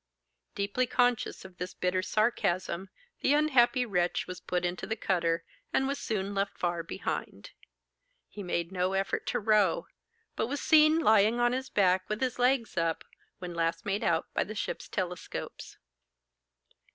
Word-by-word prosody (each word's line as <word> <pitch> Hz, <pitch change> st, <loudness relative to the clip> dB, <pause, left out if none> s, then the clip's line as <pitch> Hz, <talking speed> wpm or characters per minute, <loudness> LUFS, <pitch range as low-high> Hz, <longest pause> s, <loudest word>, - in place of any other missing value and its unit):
Deeply 205 Hz, +6 st, 0 dB
conscious 245 Hz, -4 st, +1 dB
of 185 Hz, -1 st, -13 dB
this 180 Hz, +1 st, -5 dB
bitter 185 Hz, 0 st, 0 dB
sarcasm, 190 Hz, -3 st, 0 dB, 0.3 s
the 275 Hz, -, +3 dB
unhappy 260 Hz, -4 st, +4 dB
wretch 180 Hz, -5 st, 0 dB
was 180 Hz, -1 st, -7 dB
put 180 Hz, 0 st, -2 dB
into 175 Hz, 0 st, -3 dB
the 220 Hz, -, -1 dB
cutter, 170 Hz, -5 st, 0 dB, 0.3 s
and 265 Hz, -, +2 dB
was 280 Hz, +1 st, -2 dB
soon 200 Hz, -2 st, -2 dB
left 200 Hz, 0 st, -1 dB
far 175 Hz, -1 st, -1 dB
behind. 165 Hz, -, -5 dB, 0.8 s
He 210 Hz, -, -9 dB
made 170 Hz, -2 st, -2 dB
no 185 Hz, 0 st, 0 dB
effort 195 Hz, 0 st, -1 dB
to -, -, 0 dB
row, 210 Hz, -4 st, +3 dB, 0.5 s
but 225 Hz, -, -1 dB
was 285 Hz, +3 st, -3 dB
seen 310 Hz, 0 st, +5 dB
lying 220 Hz, -5 st, +4 dB
on 240 Hz, 0 st, +3 dB
his 260 Hz, +1 st, -3 dB
back 185 Hz, -2 st, +2 dB
with 215 Hz, 0 st, -2 dB
his 255 Hz, -1 st, -1 dB
legs 245 Hz, -3 st, +2 dB
up, 165 Hz, -1 st, 0 dB, 0.3 s
when 180 Hz, -1 st, -6 dB
last 165 Hz, 0 st, -1 dB
made 200 Hz, 0 st, -1 dB
out 165 Hz, -1 st, +1 dB
by -, -, +1 dB
the 215 Hz, -, -8 dB
ship's 205 Hz, -, -4 dB
telescopes. 180 Hz, -2 st, -5 dB
200 Hz, 160 wpm, -30 LUFS, 180-240 Hz, 0.8 s, seen